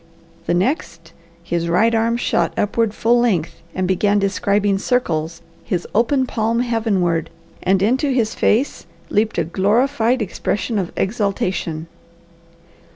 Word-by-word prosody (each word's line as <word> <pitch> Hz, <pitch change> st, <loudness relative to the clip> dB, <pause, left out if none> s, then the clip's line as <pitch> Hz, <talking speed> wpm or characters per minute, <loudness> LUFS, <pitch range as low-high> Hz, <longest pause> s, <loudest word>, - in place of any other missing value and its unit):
The 175 Hz, -, +2 dB
next 175 Hz, -, -2 dB, 0.3 s
his 170 Hz, 0 st, -2 dB
right 220 Hz, +7 st, +3 dB
arm 230 Hz, +1 st, +1 dB
shot 170 Hz, -7 st, 0 dB
upward 220 Hz, +1 st, +1 dB
full 240 Hz, +2 st, +3 dB
length, 195 Hz, -10 st, 0 dB
and 185 Hz, 0 st, 0 dB
began 200 Hz, +2 st, +2 dB
describing 200 Hz, 0 st, +1 dB
circles, 165 Hz, -9 st, -1 dB, 0.2 s
his 180 Hz, -5 st, -2 dB
open 260 Hz, +5 st, +2 dB
palm 230 Hz, -1 st, 0 dB
heavenward, 200 Hz, -9 st, 0 dB, 0.3 s
and 190 Hz, +1 st, +2 dB
into 260 Hz, +7 st, +2 dB
his 235 Hz, -4 st, +1 dB
face 245 Hz, +7 st, 0 dB, 0.2 s
leapt 220 Hz, +2 st, +1 dB
a 170 Hz, -, +2 dB
glorified 230 Hz, -, +1 dB
expression 210 Hz, +2 st, -2 dB
of 180 Hz, -3 st, -3 dB
exultation. 190 Hz, -6 st, -1 dB
205 Hz, 125 wpm, -20 LUFS, 180-230 Hz, 0.3 s, right